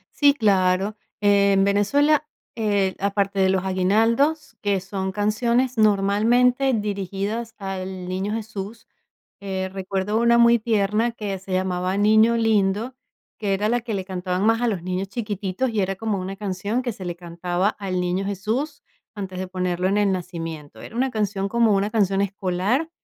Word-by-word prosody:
Sí, 285 Hz, -1 st, +5 dB
claro. 195 Hz, -3 st, +2 dB, 0.3 s
En 200 Hz, -1 st, +4 dB
Venezuela, 280 Hz, +10 st, +2 dB, 0.3 s
eh, 205 Hz, -4 st, 0 dB
aparte 200 Hz, 0 st, 0 dB
de 190 Hz, 0 st, +4 dB
los 190 Hz, 0 st, +1 dB
aguinaldos, 225 Hz, +11 st, +1 dB
que 200 Hz, -2 st, +1 dB
son 190 Hz, 0 st, -4 dB
canciones, 235 Hz, +5 st, 0 dB
normalmente, 225 Hz, +6 st, +3 dB
dirigidas 205 Hz, +2 st, -3 dB
al 190 Hz, -2 st, -5 dB
niño 190 Hz, +3 st, -2 dB
Jesús, 215 Hz, 0 st, -6 dB, 0.5 s
eh, 190 Hz, -1 st, -3 dB
recuerdo 195 Hz, +2 st, -2 dB
una 235 Hz, 0 st, +4 dB
muy 235 Hz, 0 st, +6 dB
tierna, 215 Hz, +1 st, +1 dB
que 205 Hz, -4 st, -4 dB
se 190 Hz, 0 st, -10 dB
llamaba 185 Hz, 0 st, 0 dB
Niño 220 Hz, +3 st, +4 dB
Lindo, 220 Hz, +2 st, +1 dB, 0.4 s
que 205 Hz, -2 st, 0 dB
era 205 Hz, +2 st, 0 dB
la 240 Hz, +2 st, +1 dB
que 225 Hz, -2 st, -5 dB
le 190 Hz, -2 st, -3 dB
cantaban 185 Hz, 0 st, -2 dB
más 225 Hz, +2 st, +3 dB
a 245 Hz, -, +2 dB
los 200 Hz, -6 st, -1 dB
niños 185 Hz, +2 st, -3 dB
chiquititos 210 Hz, +1 st, -2 dB
y 215 Hz, -3 st, 0 dB
era 195 Hz, +1 st, -1 dB
como 220 Hz, -2 st, -1 dB
una 190 Hz, +1 st, -5 dB
canción 205 Hz, +4 st, -2 dB
que 245 Hz, -2 st, -3 dB
se 195 Hz, -, -9 dB
le 175 Hz, -1 st, -3 dB
cantaba 175 Hz, +2 st, -1 dB
al 190 Hz, -3 st, -2 dB
niño 180 Hz, +2 st, -1 dB
Jesús, 225 Hz, -, -3 dB, 0.3 s
antes 190 Hz, -3 st, -6 dB
de 185 Hz, 0 st, -3 dB
ponerlo 180 Hz, -1 st, -1 dB
en 200 Hz, -, +1 dB
el 205 Hz, -1 st, +3 dB
nacimiento. 165 Hz, -5 st, -6 dB
Era -, -, -10 dB
una 260 Hz, +2 st, 0 dB
canción, 205 Hz, -3 st, -1 dB
como 230 Hz, 0 st, +3 dB
una 200 Hz, +1 st, +1 dB
canción 195 Hz, -3 st, +2 dB
escolar, 200 Hz, -, -1 dB
200 Hz, 165 wpm, -23 LUFS, 190-225 Hz, 0.5 s, muy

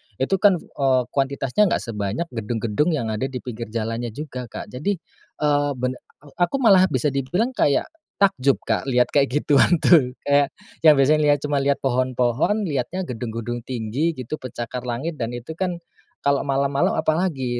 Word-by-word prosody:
itu 135 Hz, -, 0 dB
kan, 200 Hz, -1 st, +5 dB
eee, 135 Hz, -6 st, 0 dB
kuantitasnya 140 Hz, +7 st, +1 dB
enggak -, -, 0 dB
sebanyak 105 Hz, +5 st, -3 dB
gedung-gedung 115 Hz, +3 st, -1 dB
yang 115 Hz, -6 st, -2 dB
ada 110 Hz, +5 st, -2 dB
di 130 Hz, -, -5 dB
pinggir 115 Hz, -2 st, -6 dB
jalannya 115 Hz, +2 st, -3 dB
juga, 130 Hz, -5 st, -6 dB
Kak. -, -, -8 dB
Jadi, 150 Hz, +11 st, -1 dB, 0.5 s
eee, 145 Hz, -1 st, +2 dB
ben 125 Hz, 0 st, -1 dB, 0.3 s
a 160 Hz, +5 st, -1 dB
aku 275 Hz, -, -4 dB
malah 195 Hz, -8 st, +5 dB
bisa 150 Hz, -5 st, 0 dB
dibilang 175 Hz, -, -1 dB
kayak 145 Hz, -, +2 dB, 0.3 s
takjub, 140 Hz, -10 st, +3 dB
Kak, -, -, -1 dB
lihat 125 Hz, -2 st, +2 dB
kayak 140 Hz, -1 st, +3 dB, 0.2 s
gituan 145 Hz, +4 st, +4 dB
tuh. 130 Hz, -8 st, +5 dB
Kayak 145 Hz, 0 st, +2 dB, 0.3 s
yang 155 Hz, -, +9 dB
biasanya 145 Hz, +2 st, +4 dB
cuma 145 Hz, -1 st, 0 dB
lihat 140 Hz, 0 st, 0 dB
pohon-pohon, 130 Hz, -, +1 dB
lihatnya 165 Hz, +3 st, -2 dB
gedung-gedung 120 Hz, -3 st, -4 dB
tinggi 130 Hz, +7 st, -1 dB
gitu, 130 Hz, +4 st, -6 dB
pencakar 125 Hz, 0 st, -6 dB
langit. 140 Hz, +6 st, -3 dB
Dan 115 Hz, +1 st, -3 dB
itu 120 Hz, +6 st, -7 dB
kan 175 Hz, 0 st, -3 dB, 0.4 s
kalau 140 Hz, 0 st, +1 dB
malam-malam, 140 Hz, +1 st, +1 dB
apalagi 155 Hz, -7 st, 0 dB
135 Hz, 160 wpm, -22 LUFS, 120-155 Hz, 0.5 s, yang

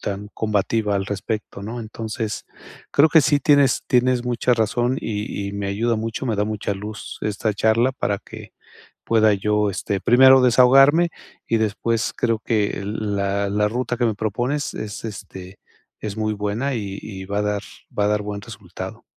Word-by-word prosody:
tan 100 Hz, +1 st, -4 dB
combativa 105 Hz, 0 st, 0 dB
al 95 Hz, -, -2 dB
respecto, 100 Hz, 0 st, -4 dB
¿no? 115 Hz, +4 st, -5 dB
Entonces, 110 Hz, -1 st, -5 dB, 0.5 s
creo 150 Hz, +3 st, +5 dB
que 160 Hz, +1 st, +6 dB
sí 145 Hz, +1 st, +3 dB
tienes 145 Hz, -4 st, +4 dB
tienes 125 Hz, 0 st, +2 dB
mucha 125 Hz, 0 st, +1 dB
razón 120 Hz, +3 st, 0 dB
y 105 Hz, -2 st, -4 dB
y -, -, -6 dB
me 100 Hz, 0 st, -3 dB
ayuda 115 Hz, +4 st, 0 dB
mucho, 115 Hz, +4 st, -3 dB
me 115 Hz, -, 0 dB
da 105 Hz, -, +1 dB
mucha 105 Hz, -1 st, -3 dB
luz 105 Hz, +2 st, -7 dB
esta 105 Hz, +1 st, -1 dB
charla 110 Hz, +5 st, +2 dB
para 100 Hz, -6 st, -1 dB
que -, -, -12 dB, 0.5 s
pueda 110 Hz, -2 st, +4 dB
yo, 105 Hz, +1 st, +1 dB
este, 95 Hz, +1 st, -2 dB
primero 130 Hz, +4 st, +7 dB
desahogarme, 135 Hz, +7 st, +6 dB, 0.4 s
y 115 Hz, -, +2 dB
después 110 Hz, +1 st, -1 dB
creo 115 Hz, -2 st, +1 dB
que 105 Hz, -3 st, -1 dB
la 100 Hz, -1 st, -1 dB
la 105 Hz, +1 st, +1 dB
ruta 125 Hz, +1 st, -2 dB
que 120 Hz, -, +1 dB
me 110 Hz, -, +1 dB
propones 120 Hz, +7 st, -2 dB
es, 105 Hz, -1 st, -6 dB
este, 95 Hz, -3 st, -8 dB, 0.4 s
es 105 Hz, -2 st, -5 dB
muy 110 Hz, -1 st, 0 dB
buena 105 Hz, +7 st, -2 dB
y 100 Hz, -3 st, -4 dB
y 95 Hz, -3 st, -8 dB
va 100 Hz, +2 st, -2 dB
a -, -, +2 dB
dar 105 Hz, -1 st, -1 dB, 0.4 s
va 105 Hz, -, +2 dB
a -, -, +3 dB
dar 105 Hz, 0 st, +1 dB
buen 100 Hz, 0 st, -5 dB
resultado. -, -, -9 dB
110 Hz, 175 wpm, -22 LUFS, 100-120 Hz, 0.5 s, primero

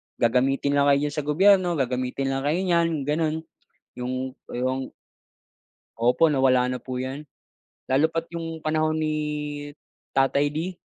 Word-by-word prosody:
gagamitin 130 Hz, +4 st, +2 dB
lang 140 Hz, 0 st, +4 dB
kayo 140 Hz, 0 st, +5 dB
diyan 145 Hz, -, -6 dB
sa 145 Hz, -, -5 dB
gobyerno, 185 Hz, +2 st, +4 dB
gagamitin 130 Hz, 0 st, -1 dB
lang 135 Hz, -, -1 dB
kayo 165 Hz, +5 st, +1 dB
niyan 170 Hz, -2 st, +3 dB
'yung 155 Hz, -4 st, -2 dB
ganun, 155 Hz, +2 st, 0 dB, 0.6 s
'yung 125 Hz, +1 st, -3 dB, 0.4 s
'yung 130 Hz, +2 st, -1 dB, 1.2 s
opo, 125 Hz, +7 st, +4 dB
nawala 130 Hz, -2 st, +3 dB
na 125 Hz, -, -3 dB
po 130 Hz, +1 st, -6 dB
'yan, 140 Hz, +3 st, -6 dB, 0.6 s
lalo 135 Hz, +4 st, +4 dB
pa 165 Hz, -, -1 dB
'yung 165 Hz, -2 st, -6 dB
panahon 155 Hz, 0 st, 0 dB
ni 155 Hz, 0 st, 0 dB, 1.0 s
tatay 140 Hz, +2 st, +2 dB
D. 170 Hz, +3 st, -3 dB
145 Hz, 145 wpm, -25 LUFS, 130-160 Hz, 1.2 s, kayo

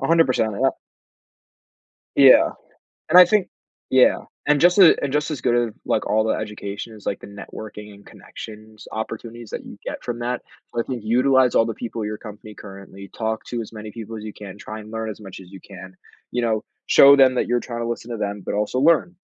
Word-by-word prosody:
100%, 135 Hz, -8 st, +2 dB
yep. 135 Hz, -, +3 dB, 1.4 s
Yeah. -, -, +7 dB, 0.6 s
And 180 Hz, -, +6 dB
I 180 Hz, -, +11 dB
think 195 Hz, 0 st, +1 dB, 0.4 s
yeah. 130 Hz, -1 st, +5 dB, 0.3 s
And 150 Hz, -1 st, +3 dB
just 175 Hz, +2 st, +5 dB
a 185 Hz, -4 st, +8 dB
just 150 Hz, +2 st, -1 dB
as 145 Hz, -, -5 dB
good 120 Hz, -1 st, +2 dB
as, -, -, -15 dB
like, -, -, 0 dB
all 110 Hz, +1 st, +2 dB
the 110 Hz, -, +1 dB
education, 105 Hz, +1 st, -6 dB
is, 105 Hz, -, -15 dB
like, 100 Hz, -, -2 dB
the -, -, -11 dB
networking 105 Hz, +1 st, -10 dB
and 100 Hz, 0 st, -17 dB
connections 110 Hz, 0 st, -12 dB
opportunities 115 Hz, +1 st, -6 dB
that -, -, -5 dB
you -, -, -11 dB
get -, -, -6 dB
from 120 Hz, -1 st, -4 dB
that, 120 Hz, +1 st, -3 dB, 0.3 s
so 120 Hz, -, -2 dB
I -, -, +1 dB
think 120 Hz, -4 st, -6 dB
utilize 130 Hz, +2 st, +3 dB
all 115 Hz, -, +5 dB
the 115 Hz, -, -3 dB
people 115 Hz, 0 st, -6 dB
at -, -, -2 dB
your 105 Hz, 0 st, -5 dB
company 105 Hz, -1 st, -11 dB
currently, 100 Hz, -1 st, -11 dB
talk 110 Hz, -1 st, -2 dB
to 120 Hz, -1 st, -4 dB
as 110 Hz, -, -9 dB
many 110 Hz, -1 st, -8 dB
people 115 Hz, 0 st, -8 dB
as 105 Hz, -, -9 dB
you 110 Hz, -1 st, -7 dB
can, 100 Hz, -2 st, -10 dB
try 110 Hz, +1 st, -8 dB
and 110 Hz, 0 st, -12 dB
learn 110 Hz, 0 st, -4 dB
as 110 Hz, -, -8 dB
much 95 Hz, -3 st, -10 dB
as 95 Hz, -1 st, -14 dB
you 95 Hz, -, -11 dB
can, 95 Hz, -1 st, -12 dB, 0.4 s
you 120 Hz, -, -1 dB
know, 110 Hz, -2 st, 0 dB, 0.2 s
show 140 Hz, 0 st, +8 dB
them 130 Hz, -2 st, +5 dB
that -, -, 0 dB
you're 120 Hz, 0 st, +1 dB
trying 120 Hz, -1 st, -6 dB
to 115 Hz, -, -2 dB
listen 120 Hz, 0 st, -5 dB
to 115 Hz, -, -4 dB
them, 100 Hz, -1 st, -3 dB
but -, -, -3 dB
also 105 Hz, +4 st, -1 dB
learn. 170 Hz, +4 st, +3 dB
110 Hz, 220 wpm, -22 LUFS, 105-125 Hz, 1.4 s, I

